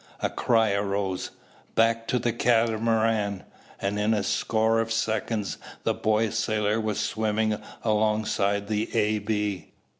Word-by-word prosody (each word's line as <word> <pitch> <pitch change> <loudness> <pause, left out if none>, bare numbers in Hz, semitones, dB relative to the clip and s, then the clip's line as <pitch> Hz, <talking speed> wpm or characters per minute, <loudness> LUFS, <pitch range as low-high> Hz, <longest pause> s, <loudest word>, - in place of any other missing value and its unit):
A - - 0
cry 115 -3 +2
arose, 100 -2 -1 0.5
"Back 115 0 +2
to 125 - +1
the 120 -1 0
Catamaran!" 115 -3 +1 0.4
and 100 +1 -1
in 110 +2 +2
a 105 - 0
score 110 +2 +1
of 115 0 -1
seconds 110 -2 -1 0.2
the - - +1
boy 110 0 +1
sailor 110 -1 0
was 110 -2 -2
swimming 110 0 0 0.2
alongside 105 -2 +1
the 105 0 -1
A.B. 105 -3 0
110 Hz, 125 wpm, -26 LUFS, 105-115 Hz, 0.5 s, cry